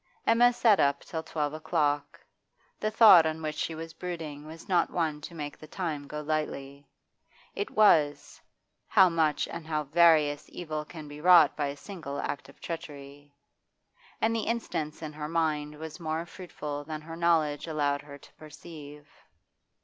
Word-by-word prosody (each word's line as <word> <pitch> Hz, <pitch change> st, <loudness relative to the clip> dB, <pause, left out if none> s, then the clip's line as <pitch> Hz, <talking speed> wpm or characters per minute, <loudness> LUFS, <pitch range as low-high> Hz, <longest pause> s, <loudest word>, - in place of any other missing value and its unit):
Emma 240 Hz, +2 st, +5 dB
sat 230 Hz, -4 st, +4 dB
up 140 Hz, 0 st, +2 dB
till 160 Hz, -, -5 dB
twelve 150 Hz, -2 st, -3 dB
o'clock. 145 Hz, -2 st, -1 dB, 0.6 s
The 215 Hz, -, 0 dB
thought 215 Hz, -7 st, +8 dB
on 160 Hz, 0 st, -4 dB
which 155 Hz, 0 st, -2 dB
she 160 Hz, +1 st, -3 dB
was 165 Hz, +1 st, -8 dB
brooding 160 Hz, -4 st, -6 dB
was 160 Hz, +1 st, -11 dB
not 180 Hz, -3 st, +2 dB
one 155 Hz, -4 st, -2 dB
to 170 Hz, +3 st, -9 dB
make 145 Hz, -2 st, -6 dB
the 155 Hz, -, -12 dB
time 155 Hz, -5 st, -4 dB
go 150 Hz, +1 st, -5 dB
lightly; 145 Hz, -2 st, -4 dB, 0.7 s
it 415 Hz, -, -3 dB
was 155 Hz, -9 st, +3 dB, 0.5 s
how 190 Hz, -4 st, +6 dB
much 160 Hz, -3 st, +1 dB
and 155 Hz, -, -8 dB
how 155 Hz, -1 st, -1 dB
various 150 Hz, -1 st, +4 dB
evil 155 Hz, -3 st, -5 dB
can 155 Hz, -1 st, -10 dB
be 145 Hz, +1 st, -10 dB
wrought 170 Hz, -4 st, +7 dB
by 145 Hz, -2 st, -1 dB
a 140 Hz, +1 st, -5 dB
single 150 Hz, -6 st, -7 dB
act 145 Hz, -, -4 dB
of -, -, -18 dB
treachery. 145 Hz, -3 st, -8 dB, 0.8 s
And 225 Hz, +1 st, +1 dB
the 225 Hz, -, -2 dB
instance 165 Hz, -10 st, -3 dB
in 155 Hz, -1 st, -6 dB
her 150 Hz, 0 st, -6 dB
mind 155 Hz, -2 st, -1 dB
was 160 Hz, +2 st, -8 dB
more 160 Hz, 0 st, -3 dB
fruitful 150 Hz, -5 st, -7 dB
than 155 Hz, +1 st, -6 dB
her 165 Hz, +1 st, -9 dB
knowledge 165 Hz, -3 st, +1 dB
allowed 145 Hz, -2 st, 0 dB
her 145 Hz, -1 st, -11 dB
to -, -, -19 dB
perceive. 150 Hz, -1 st, -12 dB
155 Hz, 165 wpm, -28 LUFS, 145-170 Hz, 0.8 s, thought